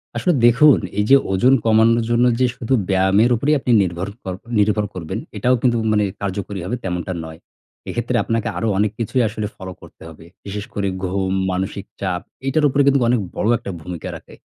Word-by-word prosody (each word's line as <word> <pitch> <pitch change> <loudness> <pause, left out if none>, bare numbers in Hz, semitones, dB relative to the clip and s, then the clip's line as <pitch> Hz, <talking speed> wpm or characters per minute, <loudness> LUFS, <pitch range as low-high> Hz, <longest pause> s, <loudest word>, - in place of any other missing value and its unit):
আসলে 180 - +1
দেখুন, 125 - +6 0.2
এই 105 - +2
যে 135 - +8 0.2
ওজন 125 +8 +4
কমানোর 115 +1 +4
জন্য 120 +1 +3
যে 130 - +4
শুধু 125 +2 -2 0.2
ব্যায়ামের 95 +5 +3
উপরেই 145 +6 +1
আপনি 125 - -1
নির্ভর 90 +1 -2 0.2
কর 95 - -4 0.3
নির্ভর 105 0 +2
করবেন, 80 -4 -5 0.2
এটাও 125 +1 +2
কিন্তু 120 -2 +2
মানে 105 -1 +2 0.2
কার্যকরী 100 0 -4
হবে, 110 - -2
তেমনটা 90 0 -3
নয়। 80 +1 -10 0.5
এক্ষেত্রে - - -2
আপনাকে 115 0 -1
আরো 110 - -1
অনেক 105 0 +1
কিছুই 120 +3 0
আসলে 105 0 -4
ফলো 95 -1 -8
করতে - - -16
হবে। 80 0 -14 0.2
বিশেষ 100 +1 -5
করে 100 -1 -1 0.2
ঘুম, 95 +1 -1 0.2
মানসিক 95 +1 -3 0.2
চাপ, 90 -2 -2 0.2
এইটার 150 +3 +2
উপরে 140 +2 +2
কিন্তুক 140 -2 +3
অনেক 125 - +3 0.2
বড় - - -1
একটা 100 - -7
ভূমিকা 85 0 -6
রাখে। - - -13
105 Hz, 185 wpm, -20 LUFS, 95-120 Hz, 0.5 s, যে